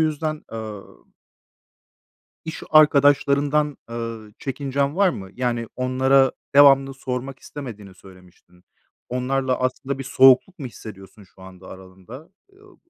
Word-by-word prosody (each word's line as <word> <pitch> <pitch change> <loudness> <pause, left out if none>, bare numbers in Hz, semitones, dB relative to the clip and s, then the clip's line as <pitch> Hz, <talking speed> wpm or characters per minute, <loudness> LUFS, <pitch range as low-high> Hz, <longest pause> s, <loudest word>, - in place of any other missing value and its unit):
yüzden, 155 0 -2
ııı 110 -3 -7 1.6
iş 160 - -7
arkadaşlarından, 145 0 +3
eee, 115 -2 -7
çekincen 140 +2 -3
var 200 -1 +4
mı? 95 - -6
Yani, 120 -2 -2
onlara 130 +1 +2 0.2
devamlı 135 -1 +6
sormak 130 0 -6
istemediğini 110 -11 -10
söylemiştin. 90 -1 -20 0.4
Onlarla 130 +1 -1
aslında 130 +2 -3
bir 135 - -6
soğukluk 135 +7 +4
mu 135 - -6
hissediyorsun 105 -3 -12
şu 95 0 -20
anda 95 0 -14
aralarında? 95 - -13 0.2
Iıı, 395 -1 -21
130 Hz, 110 wpm, -22 LUFS, 110-140 Hz, 1.6 s, devamlı